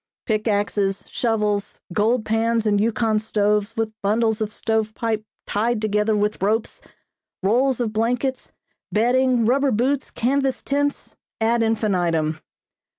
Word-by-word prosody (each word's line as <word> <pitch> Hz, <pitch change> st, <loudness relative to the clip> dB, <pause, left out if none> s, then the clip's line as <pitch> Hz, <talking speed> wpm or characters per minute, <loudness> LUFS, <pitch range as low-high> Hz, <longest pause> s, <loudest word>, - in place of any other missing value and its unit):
Pick 215 Hz, -1 st, 0 dB
axes, 200 Hz, -1 st, 0 dB
shovels, 210 Hz, -3 st, -1 dB
gold 220 Hz, +4 st, +1 dB
pans 225 Hz, +1 st, +1 dB
and 205 Hz, -1 st, +2 dB
Yukon 220 Hz, -1 st, +1 dB
stoves 210 Hz, 0 st, 0 dB
with 220 Hz, -1 st, -1 dB
bundles 220 Hz, +2 st, +1 dB
of 215 Hz, -1 st, -1 dB
stove 220 Hz, 0 st, -1 dB
pipe 220 Hz, -2 st, -1 dB, 0.2 s
tied 225 Hz, +2 st, 0 dB
together 210 Hz, 0 st, +1 dB
with 210 Hz, -1 st, 0 dB
ropes, 215 Hz, +3 st, 0 dB, 0.6 s
rolls 250 Hz, +6 st, +2 dB
of 225 Hz, -3 st, -1 dB
blankets, 245 Hz, +4 st, -1 dB, 0.4 s
bedding, 245 Hz, +2 st, +2 dB
rubber 275 Hz, +4 st, +3 dB
boots, 260 Hz, +4 st, 0 dB
canvas 270 Hz, +2 st, 0 dB
tents, 285 Hz, +1 st, -1 dB, 0.2 s
ad 230 Hz, +1 st, +2 dB
infinitum. 175 Hz, -8 st, 0 dB
220 Hz, 125 wpm, -22 LUFS, 210-235 Hz, 0.6 s, rubber